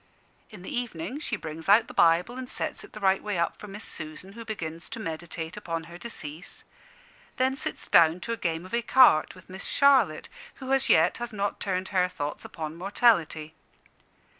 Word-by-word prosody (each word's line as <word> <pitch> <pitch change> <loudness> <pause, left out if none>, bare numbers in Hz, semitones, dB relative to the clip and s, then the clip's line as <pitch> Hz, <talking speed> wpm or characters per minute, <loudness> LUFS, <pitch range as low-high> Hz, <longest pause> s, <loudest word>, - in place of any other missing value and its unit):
In 200 -4 -12
the - - -5
evening 240 - -4
she 285 -7 -2
brings 160 -2 -7
out 215 +3 +7
the - - -10
Bible 170 +8 +3
and 255 -1 -6
sets - - -2
it 410 - -14
the - - -8
right 195 -1 +2
way 210 -3 -3
up 170 - -1
for 210 - -9
Miss 205 +2 -7
Susan, 155 +5 -4
who 230 +1 -8
begins 170 -6 -6
to 230 - -6
meditate 165 -3 -5
on 165 -1 -2
her 170 +1 -11
decease; 165 -8 -7 0.7
then 260 +1 +2
sits 275 - -3
down 165 +1 +5
to 230 - -3
a - - -4
game 165 -2 -2
of 185 - -13
ecarte 235 -9 +5
with 185 - -16
Miss 190 +1 -7
Charlotte, 260 - +4 0.3
who 265 0 -3
as 270 0 +2
yet 160 +3 +4
has 240 0 -4
not 205 -1 -2
turned 190 -1 -2
her 185 -2 +2
thoughts 150 -5 -5
upon 155 -1 -6
mortality. 170 -6 +2
185 Hz, 190 wpm, -27 LUFS, 165-230 Hz, 0.7 s, out